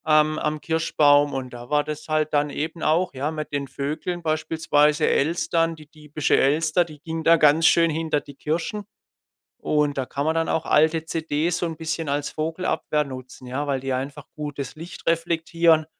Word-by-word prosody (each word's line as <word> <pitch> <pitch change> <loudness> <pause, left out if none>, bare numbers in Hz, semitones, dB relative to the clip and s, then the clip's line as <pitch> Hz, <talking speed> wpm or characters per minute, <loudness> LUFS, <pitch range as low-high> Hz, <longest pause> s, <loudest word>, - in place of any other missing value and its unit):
Am 155 0 +3
am 150 0 -2
Kirschbaum. 145 -3 +3
Und 130 -2 -4
da 120 0 -10
war 150 0 +2
das 150 0 -6
halt 155 0 0
dann 145 0 +2
eben 160 +3 -4
auch, 170 +3 +1
ja, 135 +3 -2
mit 155 -1 -5
den 140 -1 -2
Vögeln 155 +6 -4
beispielsweise, 155 -1 +2
Elstern, 165 +2 +1
die 155 -1 -14
diebische 150 -1 -1
Elster, 155 +5 +2
die 155 -3 -13
ging 165 -1 -4
da 165 +1 +6
ganz 155 +1 +5
schön 165 -1 +4
hinter 155 -1 0
die 140 - -13
Kirschen. 165 +8 -3 0.7
Und, 150 -2 0
da 135 - -1
kann 140 +3 -3
man 160 +1 +1
dann 165 0 0
auch 160 - 0
alte 160 +1 +3
CDs 160 +1 -1
so 180 - -1
'n 165 -2 -4
bisschen 160 -1 -3
als 145 +1 -1
Vogelabwehr 155 -1 -1
nutzen, 130 -1 -10
ja? 135 +4 -3
Weil 140 -2 -1
die 135 0 -3
einfach 135 +2 -4
gut 145 -2 -6
das 135 +1 -5
Licht 165 +2 -10
reflektieren. 165 -1 +2
155 Hz, 190 wpm, -24 LUFS, 145-165 Hz, 0.7 s, da